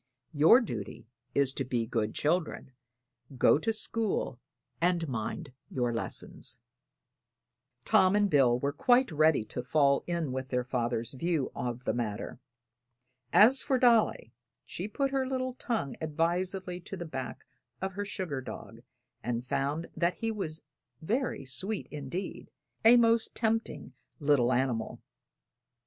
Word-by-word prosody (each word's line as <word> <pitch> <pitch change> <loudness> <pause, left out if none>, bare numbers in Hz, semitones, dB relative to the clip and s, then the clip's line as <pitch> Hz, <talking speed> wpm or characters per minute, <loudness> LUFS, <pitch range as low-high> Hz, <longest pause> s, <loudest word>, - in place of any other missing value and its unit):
Your 160 - +7
duty 115 - -6 0.3
is 140 -2 +2
to 135 - -2
be 120 -3 -1
good 110 -2 -2
children, 160 -3 -1 0.7
go 135 - +5
to 225 - 0
school 220 - -2 0.4
and 170 -1 +2
mind 130 +4 -4 0.2
your 120 -2 -1
lessons." 115 - -4 1.3
Tom 185 +1 +4
and 205 0 +4
Bill 135 -8 +4
were 140 +3 -1
quite 245 - +3
ready 155 -6 +3
to 125 - -5
fall 140 +1 +2
in 170 -5 -1
with 130 0 -4
their 125 -1 0
father's 120 -1 -2
view 160 0 -1
of 120 0 -4
the - - 0
matter. 115 -1 -4 0.9
As 250 +6 +6
for 270 -3 +1
Dolly, 235 - +3 0.3
she 185 - -5
put 275 +5 -1
her 265 -1 0
little 255 -1 -2
tongue 225 - -3
advisedly 175 +4 0
to 190 +2 -8
the 175 - -5
back 130 -5 -6 0.3
of 190 0 -3
her 205 +2 -3
sugar 185 -9 -4
dog 115 -1 -9 0.4
and 120 0 -3
found 140 +4 -1
that 170 +2 +1
he 225 0 -2
was 165 -8 -5 0.4
very 225 - -2
sweet 185 - -2
indeed 150 +6 -5 0.3
a 230 +2 +8
most 230 -1 +3
tempting 220 - -1 0.3
little 140 -4 +3
animal. 120 -3 -1
155 Hz, 135 wpm, -30 LUFS, 130-205 Hz, 1.3 s, a